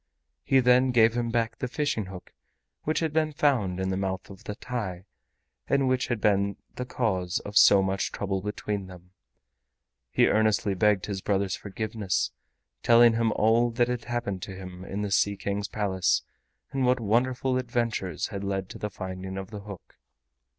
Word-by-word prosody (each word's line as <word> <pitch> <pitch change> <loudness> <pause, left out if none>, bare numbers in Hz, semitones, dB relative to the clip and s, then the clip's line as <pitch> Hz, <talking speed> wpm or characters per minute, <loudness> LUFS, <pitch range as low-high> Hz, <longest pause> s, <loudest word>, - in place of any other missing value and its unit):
He 135 -1 +4
then 125 +1 +5
gave 115 -2 +5
him 120 -1 -1
back 115 -1 -1
the 125 - -2
fishing 145 -5 -1
hook 95 -1 -10 0.5
which 155 +2 0
had 160 -2 -1
been 155 -1 +1
found 120 -12 +1
in 95 0 -1
the - - 0
mouth 95 0 -3
of 95 - -13
the 105 - -4
TAI 100 -8 -5 0.6
and 140 -1 +2
which 130 -1 +1
had 120 -3 -1
been 100 -1 +2 0.2
the 125 - -5
cause 95 -8 -1
of 105 - -9
so 100 -1 +7
much 95 0 -1
trouble 95 -1 -2
between 105 -1 -3
them. 90 -1 -13 1.0
He - - +3
earnestly 110 -2 +2
begged 100 0 +2
his 100 -2 -4
brother's 100 -1 0
forgiveness, 105 -1 -2 0.5
telling 120 0 +6
him 115 0 +1
all 115 +2 +3
that 120 +1 +1
had 125 -1 -3
happened 120 -6 -3
to 95 - -6
him 95 -1 -9
in 100 +2 -4
the 100 - -3
Sea 100 0 +2
King's 100 +1 -2
Palace 95 -5 0 0.5
and 135 -1 -1
what 125 0 +3
wonderful 125 +4 +1
adventures 120 - -2
had 100 -1 -5
led 95 -1 -2
to - - -9
the 105 - -3
finding 95 0 -6
of 95 +2 -6
the 105 - -6
hook. 100 -3 -11
105 Hz, 180 wpm, -27 LUFS, 95-120 Hz, 1.0 s, so